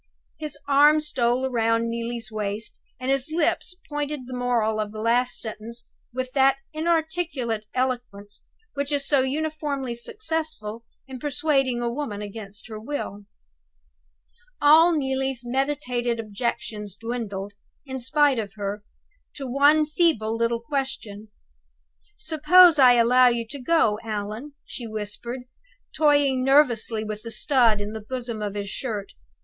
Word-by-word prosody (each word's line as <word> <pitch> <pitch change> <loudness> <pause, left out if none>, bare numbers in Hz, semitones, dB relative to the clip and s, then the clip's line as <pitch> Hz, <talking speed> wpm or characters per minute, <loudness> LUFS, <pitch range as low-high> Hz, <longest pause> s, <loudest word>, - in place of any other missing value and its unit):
His 305 -1 -6
arm 295 +2 +6
stole 255 -4 +1
round 230 -1 +1
Neelie's 230 -1 -4
waist, 210 0 -3 0.2
and 260 +1 -1
his 275 +2 0
lips 345 +2 0
pointed 295 -1 -3
the 255 - -8
moral 240 -3 0
of 210 -1 -2
the 215 - -8
last 240 +3 +2
sentence 230 +1 -6 0.3
with 255 +1 -4
that 270 0 +4 0.2
inarticulate 315 -8 -1
eloquence 245 -6 -3 0.3
which 280 +1 -2
is 280 -1 +1
so 280 -3 +4
uniformly 285 -2 -2
successful 310 - -3 0.2
in 260 -1 -8
persuading 270 -3 +1
a 235 - 0
woman 235 -6 -4
against 205 0 -7
her 215 -2 -7
will. 215 -5 -5 1.3
All 315 +4 +7
Neelie's 265 -4 -1
meditated 250 -2 -1
objections 210 -2 -4
dwindled, 205 -3 -5 0.3
in 265 -1 -5
spite 275 +1 +3
of 205 -2 -5
her, 205 0 -4 0.5
to 275 - -5
one 285 +4 +4
feeble 300 -9 +1
little 230 0 0
question. 230 -6 -4 0.9
"Suppose 325 +1 +6
I 255 -2 +8
allow 245 +2 +5
you 235 -1 +1
to 285 - -6
go, 245 -8 +2
Allan?" 215 +6 -5
she 240 - -6
whispered, 220 +4 -5 0.5
toying 285 -4 +3
nervously 245 -5 +3
with 215 -1 -5
the 230 - -7
stud 235 -4 +3
in 205 +1 -4
the 220 - -5
bosom 235 -1 -5
of 205 -1 -3
his 200 -1 -3
shirt. 215 -7 -4
245 Hz, 135 wpm, -25 LUFS, 220-285 Hz, 1.3 s, I